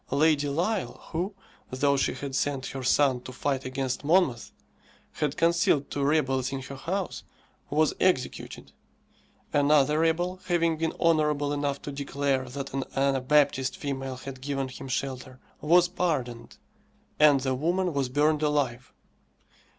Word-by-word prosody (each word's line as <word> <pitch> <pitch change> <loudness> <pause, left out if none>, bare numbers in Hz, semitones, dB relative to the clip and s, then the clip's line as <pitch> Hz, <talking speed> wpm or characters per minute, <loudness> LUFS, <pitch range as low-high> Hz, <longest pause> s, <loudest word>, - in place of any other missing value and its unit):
Lady 145 0 +2
Lisle, 180 +8 -1
who, 180 +5 -2 0.3
though 140 +2 +1
she 135 - 0
had 140 -1 -6
sent 135 -1 -1
her 135 - -6
son 130 0 +2
to 130 - -9
fight 135 +1 -2
against 130 +1 -3
Monmouth, 150 -7 +2 0.6
had 150 -1 -2
concealed 165 -4 +2
two 140 - -1
rebels 135 -3 +1
in 135 - -3
her 135 +1 -8
house, 185 +7 -3 0.5
was 155 +1 +2
executed; 180 -9 -1 0.8
another 145 +1 +4
rebel, 175 +3 +1
having 170 -2 +1
been 160 +1 -2
honourable 150 -3 +2
enough 145 -1 -1
to 145 - -5
declare 140 -2 -1
that 135 +1 -6
an 135 0 -1
Anabaptist 135 0 +2
female 135 -2 -4
had 130 0 -9
given 135 -1 -2
him 130 - -9
shelter, 130 -1 -4 0.2
was 175 +3 +5
pardoned, 150 -10 -3 0.6
and 145 -3 +6
the 130 0 0
woman 175 +6 0
was 140 -3 -1
burned 150 +3 +2
alive. 140 -5 -1
140 Hz, 140 wpm, -27 LUFS, 135-155 Hz, 0.8 s, and